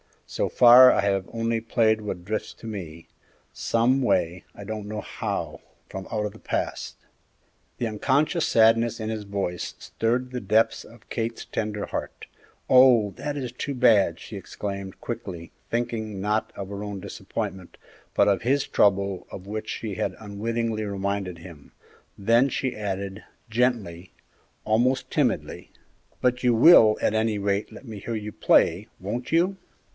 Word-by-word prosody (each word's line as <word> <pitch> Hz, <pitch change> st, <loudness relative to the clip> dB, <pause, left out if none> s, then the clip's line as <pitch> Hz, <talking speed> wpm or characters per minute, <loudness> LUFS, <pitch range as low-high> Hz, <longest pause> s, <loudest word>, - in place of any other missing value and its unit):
So -, -, -2 dB
far 125 Hz, +1 st, +8 dB
I -, -, +2 dB
have 100 Hz, -2 st, 0 dB
only 115 Hz, 0 st, 0 dB
played 110 Hz, -1 st, +2 dB
what 100 Hz, -4 st, -5 dB
drifts 110 Hz, +2 st, -3 dB
to -, -, -14 dB
me 85 Hz, -7 st, -7 dB, 0.5 s
some 125 Hz, +4 st, +1 dB
way, 90 Hz, -7 st, 0 dB
I 100 Hz, -, -9 dB
don't 105 Hz, 0 st, -5 dB
know 105 Hz, 0 st, -4 dB
how -, -, -4 dB, 0.3 s
from 95 Hz, 0 st, -7 dB
out 105 Hz, -1 st, -1 dB
of 105 Hz, -, -3 dB
the 110 Hz, -, -15 dB
past." -, -, -3 dB, 0.8 s
The 120 Hz, -, -2 dB
unconscious 140 Hz, -, +1 dB
sadness 115 Hz, +1 st, +4 dB
in 110 Hz, -, -3 dB
his 110 Hz, -2 st, -4 dB
voice 100 Hz, -3 st, -3 dB
stirred 125 Hz, +3 st, -2 dB
the 125 Hz, -, -3 dB
depths 110 Hz, +2 st, +1 dB
of 115 Hz, 0 st, -17 dB
Kate's 115 Hz, -1 st, -3 dB
tender 105 Hz, -2 st, -3 dB
heart. -, -, -6 dB, 0.4 s
"Oh, 125 Hz, -5 st, +6 dB
that 145 Hz, -1 st, -4 dB
is 125 Hz, -4 st, -4 dB
too 140 Hz, +3 st, -4 dB
bad!" 110 Hz, -5 st, +4 dB
she -, -, -8 dB
exclaimed, 100 Hz, -2 st, -6 dB
quickly, 90 Hz, -8 st, -6 dB, 0.2 s
thinking, 115 Hz, -4 st, -3 dB
not 105 Hz, +2 st, 0 dB
of 100 Hz, -1 st, -6 dB
her 100 Hz, 0 st, -6 dB
own 100 Hz, -1 st, -5 dB
disappointment, 90 Hz, 0 st, -6 dB, 0.4 s
but -, -, +4 dB
of 100 Hz, -3 st, +1 dB
his 135 Hz, +4 st, +1 dB
trouble 100 Hz, -2 st, +1 dB
of 95 Hz, -, -8 dB
which 110 Hz, +1 st, -5 dB
she 105 Hz, -4 st, -4 dB
had -, -, -2 dB
unwittingly 110 Hz, +1 st, -3 dB
reminded 100 Hz, -3 st, -3 dB
him; 80 Hz, -4 st, -13 dB, 0.4 s
then 115 Hz, +6 st, +4 dB
she 130 Hz, -1 st, -2 dB
added, 100 Hz, -1 st, -4 dB, 0.3 s
gently, 110 Hz, -8 st, -1 dB, 0.5 s
almost 120 Hz, +5 st, +1 dB
timidly, -, -, -1 dB, 0.5 s
"But 125 Hz, 0 st, +1 dB
you 125 Hz, -2 st, +3 dB
will, 115 Hz, -4 st, +7 dB
at -, -, +1 dB
any 110 Hz, -1 st, +1 dB
rate, 100 Hz, 0 st, -1 dB
let -, -, -12 dB
me 110 Hz, -4 st, -8 dB
hear 115 Hz, +3 st, -4 dB
you 105 Hz, -1 st, -5 dB
play, -, -, +3 dB
won't 120 Hz, +6 st, -4 dB
you?" 180 Hz, +4 st, +2 dB
110 Hz, 155 wpm, -25 LUFS, 100-120 Hz, 0.8 s, far